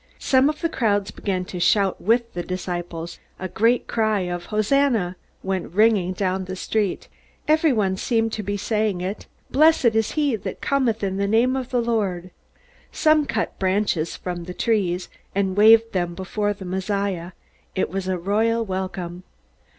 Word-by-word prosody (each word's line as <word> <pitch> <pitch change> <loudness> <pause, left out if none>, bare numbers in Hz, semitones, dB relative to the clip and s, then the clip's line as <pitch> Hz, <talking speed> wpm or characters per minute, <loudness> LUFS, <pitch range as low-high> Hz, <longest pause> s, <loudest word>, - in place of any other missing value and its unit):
Some 265 +2 +3
of 305 0 -4
the 335 - +2
crowds 205 -9 0
began 185 -3 -3
to 180 - -6
shout 195 +1 +2
with 230 +3 +1
the 175 - -3
disciples. 175 -2 -5 0.2
A 185 - -4
great 230 +6 +2
cry 215 -3 +1
of 175 -1 -4
"Hosanna!" 215 -3 +1 0.3
went 190 -3 -3
ringing 205 -3 +3
down 190 0 -1
the 185 0 -5
street. 205 0 -1 0.4
Everyone 270 - +3
seemed 225 +1 0
to 215 - -2
be 205 0 -3
saying 210 -2 -1
it. 190 +3 -5 0.2
"Blessed 305 -5 +5
is 220 -1 0
he 290 -5 +1
that - - -6
cometh 250 -6 0
in 190 -1 -1
the 200 0 0
name 235 +5 +3
of 260 -2 -3
the 245 -2 +1
Lord." 195 -6 -1 0.6
Some 310 -2 +3
cut - - -2
branches 190 -4 0
from 175 -2 -5
the 180 +1 -7
trees, 190 -6 0 0.3
and 195 -1 0
waved 225 +2 +6
them 175 -2 -1
before 205 +3 -2
the 195 -1 -10
Messiah. 190 -1 -2 0.4
It 190 - 0
was 190 0 -3
a 185 -1 0
royal 220 +5 +1
welcome. 185 -2 -4
200 Hz, 165 wpm, -23 LUFS, 185-230 Hz, 0.6 s, waved